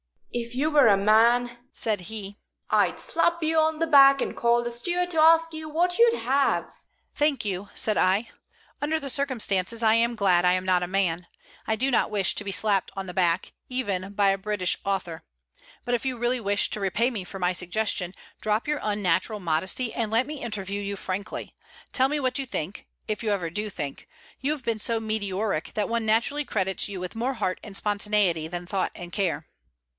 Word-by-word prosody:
"If 235 Hz, 0 st, -4 dB
you 295 Hz, +4 st, 0 dB
were 290 Hz, -5 st, +6 dB
a 200 Hz, -2 st, +5 dB
man," 235 Hz, +4 st, +3 dB
said 215 Hz, -3 st, +1 dB
he, 205 Hz, -2 st, -7 dB, 0.3 s
"I'd -, -, +2 dB
slap 340 Hz, 0 st, 0 dB
you 320 Hz, 0 st, +2 dB
on 315 Hz, 0 st, +2 dB
the 330 Hz, -, +1 dB
back 275 Hz, -3 st, +7 dB
and -, -, -2 dB
call 235 Hz, 0 st, +2 dB
the 240 Hz, -, -3 dB
steward 350 Hz, +9 st, -1 dB
to 325 Hz, -, 0 dB
ask 330 Hz, +1 st, +5 dB
you 315 Hz, 0 st, -6 dB
what 350 Hz, +5 st, +1 dB
you'd 470 Hz, 0 st, +5 dB
have." 275 Hz, +2 st, +1 dB, 0.4 s
"Thank 290 Hz, -5 st, 0 dB
you," 200 Hz, 0 st, -3 dB
said 215 Hz, -, +1 dB
I. 195 Hz, +5 st, +2 dB, 0.5 s
"Under 310 Hz, +2 st, 0 dB
the 280 Hz, -2 st, -4 dB
circumstances, 230 Hz, -6 st, +1 dB
I 220 Hz, -1 st, +5 dB
am 235 Hz, +1 st, +2 dB
glad 185 Hz, -5 st, +3 dB
I 180 Hz, -, +5 dB
am 185 Hz, 0 st, -1 dB
not 180 Hz, -1 st, +2 dB
a -, -, -2 dB
man. 180 Hz, -2 st, -1 dB, 0.4 s
I 220 Hz, -, +1 dB
do 265 Hz, +5 st, 0 dB
not 240 Hz, -, +2 dB
wish 200 Hz, -3 st, +1 dB
to 205 Hz, -, -4 dB
be 200 Hz, -, -3 dB
slapped 200 Hz, -1 st, +1 dB
on 195 Hz, -1 st, -4 dB
the 180 Hz, -, -7 dB
back, 175 Hz, -2 st, +1 dB, 0.2 s
even 200 Hz, -7 st, -3 dB
by 200 Hz, -1 st, +3 dB
a 195 Hz, -, +2 dB
British 190 Hz, -2 st, -1 dB
author. 190 Hz, -4 st, -2 dB, 0.6 s
But 245 Hz, -, -1 dB
if 245 Hz, -, -1 dB
you 260 Hz, -2 st, -1 dB
really 240 Hz, +2 st, 0 dB
wish 205 Hz, -2 st, +1 dB
to -, -, -3 dB
repay 210 Hz, +6 st, +1 dB
me 210 Hz, -6 st, -4 dB
for 195 Hz, -, -8 dB
my 180 Hz, -1 st, +1 dB
suggestion, 180 Hz, 0 st, -1 dB, 0.2 s
drop 215 Hz, +3 st, -1 dB
your 300 Hz, -, 0 dB
unnatural 205 Hz, +1 st, 0 dB
modesty 185 Hz, +8 st, 0 dB
and 225 Hz, -2 st, -2 dB
let 230 Hz, +4 st, +2 dB
me 300 Hz, -1 st, -7 dB
interview 205 Hz, -3 st, -4 dB
you 200 Hz, 0 st, -3 dB
frankly. 195 Hz, +2 st, -4 dB, 0.4 s
Tell 260 Hz, 0 st, +3 dB
me 295 Hz, +2 st, -1 dB
what 255 Hz, 0 st, 0 dB
you 270 Hz, -, -2 dB
think 190 Hz, -4 st, -5 dB, 0.2 s
if 215 Hz, -1 st, -3 dB
you 225 Hz, -, -2 dB
ever 180 Hz, -5 st, -1 dB
do 210 Hz, +4 st, -3 dB
think. 145 Hz, -8 st, -6 dB, 0.3 s
You've 290 Hz, 0 st, -2 dB
been 230 Hz, -2 st, -1 dB
so 230 Hz, +1 st, +1 dB
meteoric 205 Hz, -5 st, -2 dB
that 210 Hz, 0 st, -1 dB
one 230 Hz, -1 st, -1 dB
naturally 240 Hz, +7 st, +1 dB
credits 190 Hz, -5 st, 0 dB
you 200 Hz, -2 st, -6 dB
with 180 Hz, +2 st, -6 dB
more 245 Hz, +4 st, -1 dB
heart 185 Hz, -5 st, -2 dB
and 205 Hz, -2 st, -10 dB
spontaneity 205 Hz, -6 st, +1 dB
than 175 Hz, +1 st, -6 dB
thought 190 Hz, +1 st, -2 dB
and 175 Hz, -1 st, -8 dB
care." 175 Hz, -6 st, -1 dB
215 Hz, 205 wpm, -26 LUFS, 195-255 Hz, 0.6 s, back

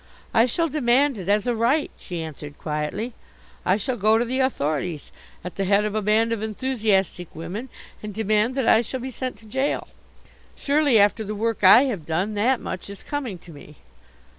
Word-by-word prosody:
"I 225 Hz, +2 st, +5 dB
shall 330 Hz, +7 st, 0 dB
demand 270 Hz, -3 st, +2 dB
it 185 Hz, 0 st, -5 dB
as 205 Hz, 0 st, +2 dB
a 245 Hz, -, +1 dB
right," 245 Hz, +7 st, +1 dB
she 175 Hz, -3 st, -6 dB
answered 150 Hz, -2 st, -9 dB
quietly. 155 Hz, +10 st, -3 dB, 0.5 s
"I 185 Hz, -, +2 dB
shall 245 Hz, +4 st, -3 dB
go 215 Hz, +2 st, +4 dB
to 235 Hz, -, +1 dB
the 255 Hz, +3 st, -2 dB
authorities, 155 Hz, -, -1 dB, 0.3 s
at 180 Hz, -, -7 dB
the 195 Hz, -, 0 dB
head 200 Hz, +2 st, +3 dB
of 210 Hz, -, -2 dB
a 215 Hz, -, 0 dB
band 215 Hz, +3 st, +2 dB
of 230 Hz, -2 st, -1 dB
enthusiastic 215 Hz, -6 st, 0 dB
women, 185 Hz, +11 st, -6 dB, 0.3 s
and 210 Hz, -, -6 dB
demand 215 Hz, +3 st, +1 dB
that 265 Hz, -4 st, 0 dB
I 220 Hz, -, +6 dB
shall 255 Hz, +3 st, -5 dB
be 260 Hz, +2 st, -5 dB
sent 255 Hz, -1 st, -5 dB
to 220 Hz, -, -18 dB
jail. 265 Hz, +6 st, -1 dB, 0.7 s
Surely 285 Hz, -4 st, +2 dB
after 205 Hz, +2 st, +3 dB
the 210 Hz, 0 st, -5 dB
work 225 Hz, 0 st, -2 dB
I 215 Hz, +7 st, +9 dB
have 210 Hz, -, -3 dB
done, 180 Hz, +6 st, -1 dB
that 235 Hz, +5 st, +2 dB
much 185 Hz, -, -6 dB
is 200 Hz, -, -9 dB
coming 270 Hz, -10 st, -4 dB
to 175 Hz, -, -12 dB
me." 150 Hz, 0 st, -13 dB
215 Hz, 195 wpm, -24 LUFS, 190-250 Hz, 0.7 s, I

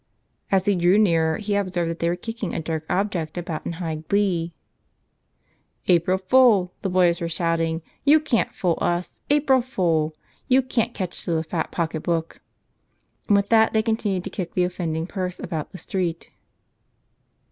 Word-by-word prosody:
As 190 Hz, -1 st, +3 dB
he 205 Hz, -1 st, +3 dB
drew 175 Hz, +2 st, +4 dB
nearer 165 Hz, -6 st, +3 dB
he 210 Hz, -1 st, -3 dB
observed 185 Hz, -4 st, 0 dB
that 165 Hz, -, -7 dB
they 170 Hz, -, +1 dB
were 175 Hz, -, 0 dB
kicking 225 Hz, +1 st, -5 dB
a -, -, -1 dB
dark 160 Hz, -1 st, -3 dB
object 180 Hz, -5 st, -1 dB
about 170 Hz, -3 st, -4 dB
in -, -, -3 dB
high 165 Hz, -2 st, -4 dB
glee. 185 Hz, -5 st, +1 dB, 1.4 s
"April 180 Hz, +1 st, +3 dB
fool!" 195 Hz, -2 st, +4 dB
the 195 Hz, -, -1 dB
boys 175 Hz, -2 st, +3 dB
were 170 Hz, -, -2 dB
shouting. 165 Hz, -1 st, -1 dB, 0.2 s
"You 295 Hz, +2 st, +6 dB
can't 290 Hz, -7 st, 0 dB
fool 175 Hz, -3 st, -1 dB
us! 175 Hz, +1 st, -2 dB
April 280 Hz, -3 st, +4 dB
fool! 165 Hz, -, 0 dB, 0.3 s
You 260 Hz, +1 st, +4 dB
can't 245 Hz, -2 st, -1 dB
catch 185 Hz, -3 st, -4 dB
us -, -, -11 dB
with 170 Hz, -2 st, +1 dB
a 160 Hz, -, -1 dB
fat 160 Hz, 0 st, -3 dB
pocketbook!" 165 Hz, 0 st, -2 dB, 0.9 s
And 205 Hz, -, +5 dB
with 200 Hz, 0 st, 0 dB
that 220 Hz, -1 st, +4 dB
they 220 Hz, 0 st, +2 dB
continued 215 Hz, -5 st, -1 dB
to -, -, -6 dB
kick 180 Hz, -4 st, -5 dB
the 180 Hz, -, +3 dB
offending 165 Hz, -3 st, -2 dB
purse 185 Hz, -1 st, -4 dB
about 160 Hz, -4 st, -4 dB
the -, -, -9 dB
street. 175 Hz, -1 st, -3 dB
180 Hz, 170 wpm, -23 LUFS, 165-205 Hz, 1.4 s, You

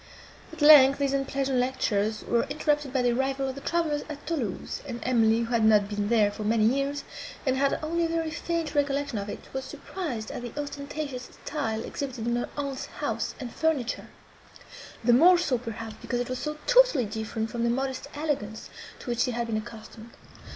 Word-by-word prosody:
At 325 Hz, -2 st, -4 dB
length, 280 Hz, -3 st, +9 dB
these 280 Hz, -1 st, 0 dB
unpleasant 270 Hz, -1 st, 0 dB
lectures 220 Hz, -4 st, 0 dB
were 235 Hz, -1 st, +1 dB
interrupted 295 Hz, -2 st, 0 dB
by 260 Hz, -2 st, +1 dB
the 245 Hz, -, +3 dB
arrival 270 Hz, +2 st, 0 dB
of 265 Hz, -, -3 dB
the 275 Hz, -, -9 dB
travellers 315 Hz, -2 st, 0 dB
at 295 Hz, -1 st, -8 dB
Thoulouse; 265 Hz, -, -3 dB
and 240 Hz, -3 st, -5 dB
Emily, 230 Hz, -2 st, +3 dB
who 230 Hz, +1 st, -2 dB
had 230 Hz, -2 st, +3 dB
not 210 Hz, -2 st, +5 dB
been 205 Hz, 0 st, -2 dB
there 215 Hz, -3 st, +4 dB
for 210 Hz, -, -6 dB
many 215 Hz, +1 st, +2 dB
years, 275 Hz, +5 st, +1 dB, 0.4 s
and 260 Hz, -1 st, +2 dB
had 275 Hz, +1 st, +2 dB
only 335 Hz, +2 st, 0 dB
a -, -, -1 dB
very 330 Hz, -1 st, -1 dB
faint 330 Hz, -1 st, -2 dB
recollection 285 Hz, -4 st, 0 dB
of 200 Hz, +1 st, -5 dB
it, -, -, -7 dB
was 265 Hz, -, -3 dB
surprised 275 Hz, -, -5 dB
at -, -, -5 dB
the 245 Hz, +4 st, -6 dB
ostentatious 285 Hz, -2 st, -5 dB, 0.2 s
style 225 Hz, -7 st, -2 dB
exhibited 260 Hz, -5 st, -5 dB
in 240 Hz, 0 st, +1 dB
her 240 Hz, -, -2 dB
aunt's 280 Hz, -2 st, -3 dB
house -, -, -3 dB
and 250 Hz, -4 st, -6 dB
furniture; 310 Hz, -7 st, 0 dB, 1.0 s
the 240 Hz, +1 st, +5 dB
more 350 Hz, +9 st, +7 dB
so, 275 Hz, -8 st, +1 dB
perhaps, 225 Hz, -2 st, -7 dB
because 245 Hz, -, -2 dB
it 245 Hz, -, -2 dB
was 255 Hz, 0 st, -3 dB
so 300 Hz, 0 st, -3 dB
totally -, -, +5 dB
different 220 Hz, +1 st, -3 dB
from 235 Hz, 0 st, -2 dB
the 235 Hz, -, +2 dB
modest 265 Hz, +2 st, -2 dB
elegance, 270 Hz, -8 st, -3 dB, 0.3 s
to -, -, -13 dB
which 240 Hz, -, -2 dB
she 250 Hz, -, +3 dB
had 235 Hz, -1 st, -1 dB
been 225 Hz, -2 st, -1 dB
accustomed. 220 Hz, 0 st, -9 dB
260 Hz, 195 wpm, -27 LUFS, 230-290 Hz, 1.0 s, length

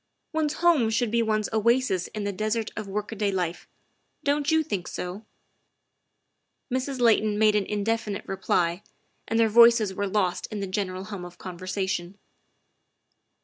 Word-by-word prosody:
One's 310 Hz, -1 st, 0 dB
home 330 Hz, -10 st, +3 dB
should 225 Hz, 0 st, 0 dB
be 235 Hz, 0 st, +2 dB
one's 215 Hz, -2 st, 0 dB
oasis 225 Hz, -4 st, +2 dB
in 215 Hz, -, -5 dB
the 200 Hz, -, -1 dB
desert 215 Hz, +2 st, -2 dB
of 215 Hz, -1 st, -5 dB
work 205 Hz, +2 st, -4 dB
a -, -, -5 dB
day 205 Hz, -1 st, 0 dB
life. 180 Hz, -2 st, -3 dB, 0.6 s
Don 285 Hz, +1 st, +2 dB
't 285 Hz, -, -1 dB
you 320 Hz, -1 st, +3 dB
think 200 Hz, -, -4 dB
so? 190 Hz, +5 st, -6 dB, 0.7 s
" 250 Hz, -, -18 dB
Mrs. 260 Hz, +1 st, -2 dB
Layton 220 Hz, -3 st, +3 dB
made 215 Hz, 0 st, +4 dB
an 205 Hz, -2 st, +1 dB
indefinite 210 Hz, 0 st, -2 dB
reply, 175 Hz, -2 st, 0 dB, 0.5 s
and 225 Hz, -, 0 dB
their 225 Hz, -, +5 dB
voices 230 Hz, -2 st, +6 dB
were 200 Hz, +1 st, -2 dB
lost 190 Hz, -3 st, 0 dB
in 210 Hz, -, -5 dB
the 200 Hz, -, -2 dB
general 185 Hz, -1 st, -3 dB
hum 200 Hz, -3 st, -7 dB
of 175 Hz, 0 st, -10 dB
conversation. 185 Hz, 0 st, -4 dB
210 Hz, 165 wpm, -26 LUFS, 190-230 Hz, 0.7 s, voices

